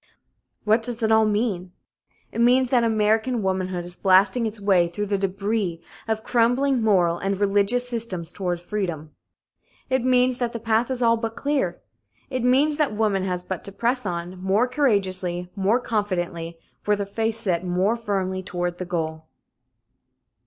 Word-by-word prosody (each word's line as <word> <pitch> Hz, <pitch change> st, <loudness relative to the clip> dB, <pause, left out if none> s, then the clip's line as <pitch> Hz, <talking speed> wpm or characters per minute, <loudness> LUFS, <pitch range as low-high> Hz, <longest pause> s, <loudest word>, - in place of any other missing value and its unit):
What 220 Hz, +2 st, +3 dB
does 235 Hz, 0 st, -4 dB
it 220 Hz, -, +2 dB
all 220 Hz, 0 st, +5 dB
mean? 205 Hz, -4 st, -1 dB, 0.6 s
It 230 Hz, -, -2 dB
means 250 Hz, +1 st, +4 dB
that 245 Hz, -3 st, +4 dB
American 220 Hz, +1 st, +1 dB
womanhood 185 Hz, -2 st, -2 dB
is 175 Hz, 0 st, -4 dB
blasting 195 Hz, +5 st, +3 dB
its 215 Hz, 0 st, -6 dB
way 190 Hz, -4 st, +3 dB
through 190 Hz, +5 st, -4 dB
the 200 Hz, 0 st, 0 dB
débris 195 Hz, -2 st, -1 dB, 0.3 s
of 220 Hz, 0 st, -1 dB
crumbling 245 Hz, +2 st, +2 dB
moral 180 Hz, -6 st, +2 dB
and 195 Hz, 0 st, -2 dB
religious 205 Hz, +5 st, +2 dB
systems 215 Hz, -9 st, -4 dB
toward 180 Hz, -3 st, -3 dB
freedom. 175 Hz, -5 st, -4 dB, 0.8 s
It 260 Hz, -2 st, +2 dB
means 255 Hz, 0 st, +3 dB
that 240 Hz, -2 st, -1 dB
the 230 Hz, -, -4 dB
path 225 Hz, +2 st, +1 dB
is 255 Hz, -2 st, -1 dB
all 230 Hz, 0 st, +4 dB
but 225 Hz, 0 st, -4 dB
clear. 285 Hz, -1 st, -1 dB, 0.5 s
It 255 Hz, -2 st, -2 dB
means 280 Hz, +4 st, +3 dB
that 295 Hz, -9 st, 0 dB
woman 205 Hz, -3 st, +1 dB
has 180 Hz, -1 st, -2 dB
but 185 Hz, -1 st, -5 dB
to 200 Hz, -, -5 dB
press 240 Hz, +5 st, -1 dB
on, 180 Hz, -1 st, -5 dB
more 200 Hz, +6 st, +2 dB
courageously, 185 Hz, -9 st, 0 dB
more 200 Hz, +4 st, +2 dB
confidently, 175 Hz, -7 st, -3 dB, 0.3 s
with 210 Hz, 0 st, +3 dB
her 200 Hz, -, -2 dB
face 225 Hz, +2 st, -1 dB
set 180 Hz, -5 st, 0 dB
more 185 Hz, +5 st, +1 dB
firmly 195 Hz, -5 st, -2 dB
toward 175 Hz, -1 st, -3 dB
the 185 Hz, -, -3 dB
goal. 160 Hz, -2 st, -4 dB
205 Hz, 165 wpm, -24 LUFS, 185-235 Hz, 0.8 s, all